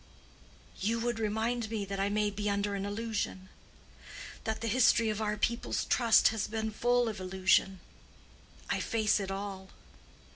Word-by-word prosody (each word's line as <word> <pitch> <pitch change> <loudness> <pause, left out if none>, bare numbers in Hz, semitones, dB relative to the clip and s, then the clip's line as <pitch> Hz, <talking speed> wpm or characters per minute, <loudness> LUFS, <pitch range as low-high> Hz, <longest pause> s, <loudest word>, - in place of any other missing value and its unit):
"You 225 +4 0
would 240 -1 -1
remind 220 +2 -1
me 215 -3 -2
that 195 0 -5
I 195 +1 +1
may 210 0 +1
be 205 +1 -2
under 200 0 -1
an 200 0 -3
illusion—that 205 -3 -3 1.1
the 230 - -3
history 230 -1 +4
of 215 +1 -4
our 210 0 -1
people's 235 +2 -1
trust 235 -3 +5
has 220 -2 -2
been 220 0 -3
full 245 +2 +2
of 215 -3 -4
illusion. 190 0 +1 0.9
I - - 0
face 215 -2 +1
it 195 -1 -4
all." 195 -1 -5
210 Hz, 150 wpm, -31 LUFS, 200-225 Hz, 1.1 s, trust